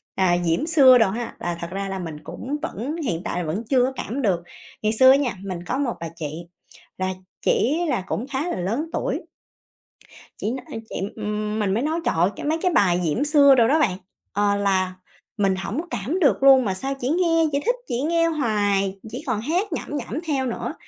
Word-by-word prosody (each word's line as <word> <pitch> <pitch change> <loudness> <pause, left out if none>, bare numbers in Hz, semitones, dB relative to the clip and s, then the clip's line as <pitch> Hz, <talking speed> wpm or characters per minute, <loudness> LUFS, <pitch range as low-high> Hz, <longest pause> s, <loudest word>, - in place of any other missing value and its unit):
à, 180 -2 +3
Diễm 170 - +1
Xưa 280 -6 +7
đồ 225 -5 +4
ha, 235 +4 -4
là 175 -1 -3
thật 170 - -3
ra 195 +1 -3
là 190 - -4
mình 160 -4 -6
cũng 280 - -5
vẫn 260 +10 -4
hiện 170 -8 -1
tại - - -3
là - - -2
vẫn 185 +9 -2
chưa 255 -3 +4
có 265 +1 -3
cảm 255 +7 -4
được. 185 -7 +1 0.4
Ngày 215 0 +1
xưa 260 +3 +7
á 270 - +6
nha, 265 -6 -1
mình 185 -3 -5
có 255 - -2
một 270 -4 0
bà 165 0 -5
chị, 160 +1 -6 0.5
là 185 0 -1 0.3
chỉ 285 +8 +2
là 250 -9 0
cũng 235 - -3
khá 280 +6 -1
là - - -2
lớn 235 - -2
tuổi. - - -2 1.2
Chị 215 - -2
nói, 260 - -6
ưm, 225 - -4
chị - - -7 0.2
ừm 210 0 -3
mình 200 -3 +1
mới 225 +5 0
nói 315 +3 0
trời - - +1
ơi, 175 +3 +4
cái - - -7
mấy 310 +2 +1
cái 365 - +2
bài 180 - +3
diễm 165 - 0
xưa 285 -2 +6
đồ 235 -3 +5
đó 300 +6 +3
bạn, 195 -12 +1 0.4
ờ, 205 0 +2
là 190 -2 +1 0.4
mình 195 -2 +2
hổng 200 +9 -3
cảm 245 - -2
được 285 -5 +3
luôn 265 -2 +7
mà 195 - 0
sao 270 +9 -3
chỉ 250 - -2
nghe 330 0 +3
chỉ 280 - +1
thích 485 +2 +2
chỉ 240 - -2
nghe 330 +3 +2
hoài, 205 -9 0
chỉ - - -6
còn 225 -5 0
hát 350 - -1
nhẩm - - -4
nhẩm 260 +1 -4
theo 275 -4 0
nữa. 240 - -3
230 Hz, 225 wpm, -23 LUFS, 195-280 Hz, 1.2 s, Xưa